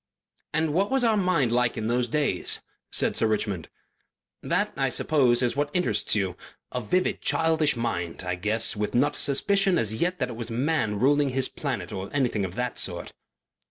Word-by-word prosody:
"And 160 -1 0
what 195 +5 +2
was 265 -1 +1
our 225 -2 +4
Mind 180 - +2
like 120 0 +1
in 110 - -2
those 120 +2 +1
days?" 150 +3 0 0.3
said - - +2
Sir 110 - +2
Richmond. 105 -6 -2 0.7
"That, - - 0
I - - +1
suppose, 130 -5 +2
is 120 - +1
what 145 +1 0
interests 180 -9 +1
you. 95 -3 0 0.4
A 125 - -2
vivid 180 - 0
childish 160 -3 +2
mind, 90 -8 -3
I 90 0 -2
guess, 105 +6 0
with 105 +2 -2
not 145 +4 +3
a - - -6
suspicion 195 +7 +2
as 110 -6 0
yet 175 +10 0
that - - -1
it 120 - -6
was 115 0 -5
Man 120 -4 0
ruling 145 +3 +3
his 130 0 0
Planet - - -4
or 95 +1 -5
anything 125 -7 +1
of 90 0 -7
that 125 0 -2
sort." 85 -2 -5
125 Hz, 190 wpm, -26 LUFS, 110-155 Hz, 0.7 s, our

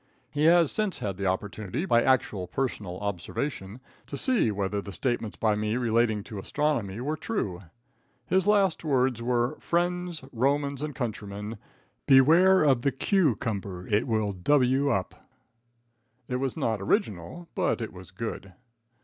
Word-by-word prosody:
He 145 +1 +1
has 170 -2 +5
since 215 -3 -1
had 100 -3 -4
the 100 -1 -1
opportunity, 105 - -2
by 120 -10 +4
actual 110 -8 +1
personal 95 -5 -3
observation, 100 - -4 0.3
to 140 - -5
see 245 - +2
whether 100 0 -1
the 100 - -8
statements 115 +2 -2
by 110 -2 +2
me 105 +2 -1
relating 115 -3 +1
to 105 -1 -7
astronomy 120 -5 -1
were 145 +5 -2
true. 130 - -3 0.6
His 190 +5 +1
last 200 -5 +3
words 130 -5 +1
were: 120 0 0
"Friends, 175 -2 -1
Romans 140 +3 0
and 150 -2 -4
countrymen, 105 -4 -5 0.5
beware 165 +8 +6
of 135 -5 +3
the 140 - +1
q 160 - +2
cumber. 95 -4 -4
It 105 +5 +1
will 110 -3 0
w 135 +7 +2
up." 95 -8 -3 1.0
It 125 - -1
was 135 +3 -2
not 115 -9 -1
original, 105 - -1
but - - 0
it 115 - -5
was 95 0 -11
good. 110 -5 -6
120 Hz, 150 wpm, -27 LUFS, 105-150 Hz, 1.0 s, beware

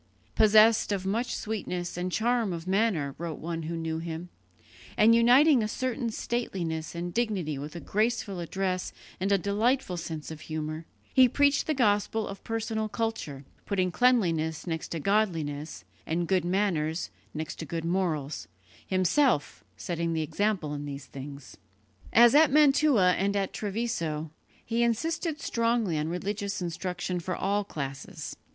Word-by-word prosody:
"Possessed 215 +1 +5
of 195 -2 -1
much 230 +6 -1
sweetness 180 -5 -4
and 180 +1 -3
charm 230 -1 +1
of 165 0 -6
manner," 190 -8 +1
wrote 165 -2 -4
one 165 0 -4
who 165 +1 -4
knew 160 -1 -2
him, 165 +1 -6 0.7
"and 220 +2 +6
uniting 250 +4 +6
a 215 - 0
certain 245 +1 -2
stateliness 175 -10 -3
and 175 +1 -4
dignity 195 - -1
with 150 +4 -7
a - - -4
graceful 215 -1 -1
address 185 +1 -2 0.3
and 195 +2 0
a 200 - +5
delightful 205 +1 0
sense 160 -2 -5
of 155 -1 -8
humour, 155 0 -5 0.3
he 260 -2 +7
preached 285 +2 +3
the 310 - +1
gospel 215 -2 +1
of 195 0 -8
personal 220 -1 -2
culture, 210 - -3 0.2
putting 185 -2 +1
cleanliness 170 -10 +2
next 165 -3 -3
to 165 - -4
godliness, 160 -6 -1 0.2
and 170 +2 -1
good 185 -2 +2
manners 175 -4 0 0.2
next 155 0 -4
to 160 - -4
good 165 +2 -3
morals, 160 -5 -1 0.4
himself 185 - +2
setting 170 -1 -2
the 160 -1 0
example 170 -1 -1
in 145 0 -5
these 140 -1 -6
things." 140 +1 -9 0.5
As 235 +1 +7
at 300 0 +6
Mantua 280 -9 +5
and 200 +1 +1
at 195 -1 -1
Treviso, 190 -8 -2 0.3
he 230 +1 0
insisted 305 +7 0
strongly 230 - 0
on 150 - -1
religious 200 +4 -3
instruction 180 +1 -3
for 175 +1 -3
all 200 +2 0
classes. 135 -7 -6
185 Hz, 150 wpm, -28 LUFS, 160-225 Hz, 0.7 s, he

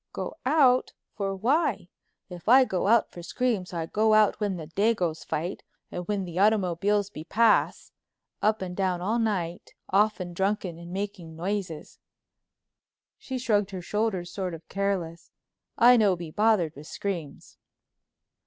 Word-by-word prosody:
"Go - - -4
out. 260 -4 +4 0.2
For 195 -2 -3
why? 260 - 0 0.4
If 180 +2 -7
I 260 +2 +7
go 190 -4 -1
out 230 +1 +3
for 175 - -9
screams 220 -1 -2
I 165 -2 -3
go 215 +5 +2
out 215 -1 +4
when 205 -3 -1
the 160 - -7
dagoes 175 -2 0
fight, 170 +5 -3 0.3
and 180 0 -5
when 205 -2 -1
the 175 0 -5
automobiles 200 0 +2
be 155 - -8
pass—up 215 0 0
and 180 -1 -6
down 185 -2 0
all 215 +6 0
night, 180 -6 -2 0.2
often 195 -3 +1
drunken 190 -2 -1
and 170 0 -10
making 190 -4 -5
noises;" 180 -2 -4 1.2
she 260 - -5
shrugged 210 -5 +1
her 190 -2 -6
shoulders 200 -4 -2
sort 185 -3 -4
of 160 0 -14
careless; 185 -4 -2 0.5
"I 245 +1 +7
no 205 -4 +4
be 170 -2 -8
bothered 205 -6 +2
with 150 +2 -11
screams." 170 -8 -6
195 Hz, 145 wpm, -27 LUFS, 175-215 Hz, 1.2 s, I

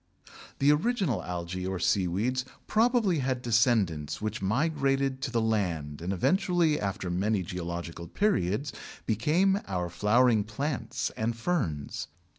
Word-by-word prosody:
The 140 +2 +4
original 165 - +1
algæ 90 +1 -4
or 95 - -2
seaweeds 95 +8 +1 0.2
probably 220 - +3
had 130 -1 -1
descendants 110 - +2
which 110 -1 -3
migrated 135 +3 +1
to 140 - -2
the 120 -1 0
land 85 -10 -1
and 90 +3 -2
eventually 170 - +2
after 95 -3 -3
many 100 +2 +1
geological 85 -1 -5
periods 140 - 0 0.3
became 165 - +2
our 90 -2 -2
flowering 110 +1 +3
plants 135 +7 -3
and 115 +1 -1
ferns. 115 - -2
110 Hz, 120 wpm, -29 LUFS, 90-145 Hz, 0.3 s, The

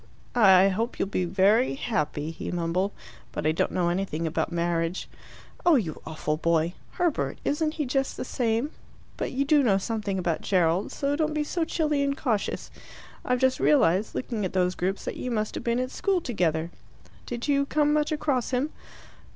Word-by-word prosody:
"I 195 -4 +6
hope 225 +5 -2
you'll 195 - -1
be 185 -2 0
very 200 +9 +3
happy," 155 - -2
he 165 - -6
mumbled. 175 +3 0 0.4
"But - - -4
I 155 - +4
don't 160 - 0
know 175 -2 +1
anything 175 -3 -2
about 160 +1 -1
marriage." 170 +1 -1 0.6
"Oh, 345 -2 +6
you 175 - -1
awful 155 -1 -2
boy! 170 +1 +1 0.2
Herbert, 350 -4 0
isn't 310 +1 0
he 300 - -1
just 270 +1 -1
the - - -4
same? 240 +3 0 0.4
But - - -3
you 275 +2 0
do 295 0 +5
know 210 -7 +3
something 205 -1 -2
about 175 -3 -1
Gerald, 180 0 +1
so 280 0 -1
don't 310 0 0
be 300 - +1
so 325 +2 -1
chilly 300 -3 0
and 280 0 0
cautious. 220 -7 -2 0.5
I've 250 - +1
just 260 0 +3
realized, 205 - +3
looking 230 -5 -3
at 185 - -2
those 180 -1 +2
groups, 190 +2 -2
that - - -4
you 255 - -4
must 215 -3 -1
have - - -5
been 235 0 +1
at 255 +1 -2
school 390 -2 +1
together. 170 - -1 0.6
Did 240 +2 -4
you 280 -1 +2
come 295 0 +2
much 300 +1 +1
across 295 -5 0
him?" 265 +4 0
220 Hz, 185 wpm, -26 LUFS, 175-280 Hz, 0.6 s, I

